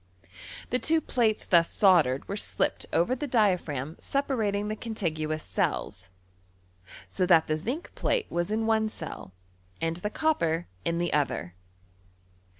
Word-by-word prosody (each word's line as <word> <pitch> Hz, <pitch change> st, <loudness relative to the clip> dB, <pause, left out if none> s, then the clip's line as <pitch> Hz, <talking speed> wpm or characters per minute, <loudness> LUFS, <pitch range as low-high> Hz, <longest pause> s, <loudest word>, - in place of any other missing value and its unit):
The 250 Hz, -, +2 dB
two 320 Hz, +4 st, +2 dB
plates 230 Hz, -7 st, 0 dB
thus 170 Hz, -2 st, +4 dB
soldered 165 Hz, -10 st, +4 dB
w^e 200 Hz, +1 st, -3 dB
slipped -, -, -1 dB
over 175 Hz, +10 st, +2 dB
the 290 Hz, +3 st, -4 dB
diaphragm 175 Hz, -, 0 dB
separating 220 Hz, -7 st, -1 dB
the 215 Hz, -, -2 dB
contiguous 160 Hz, -9 st, -3 dB
cells, 95 Hz, 0 st, -2 dB, 1.0 s
so 180 Hz, -, -1 dB
that 165 Hz, -3 st, +6 dB
the 155 Hz, -, 0 dB
zinc 245 Hz, -, -4 dB
plate 475 Hz, -3 st, 0 dB
was 175 Hz, +1 st, -1 dB
in 220 Hz, +1 st, 0 dB
one 220 Hz, -1 st, +2 dB
c^l -, -, -8 dB, 0.5 s
and 165 Hz, 0 st, -1 dB
the 210 Hz, +4 st, -3 dB
copper 175 Hz, -, 0 dB, 0.2 s
in 170 Hz, -, 0 dB
the 175 Hz, 0 st, -1 dB
other. 135 Hz, -12 st, 0 dB
190 Hz, 140 wpm, -28 LUFS, 160-225 Hz, 1.0 s, that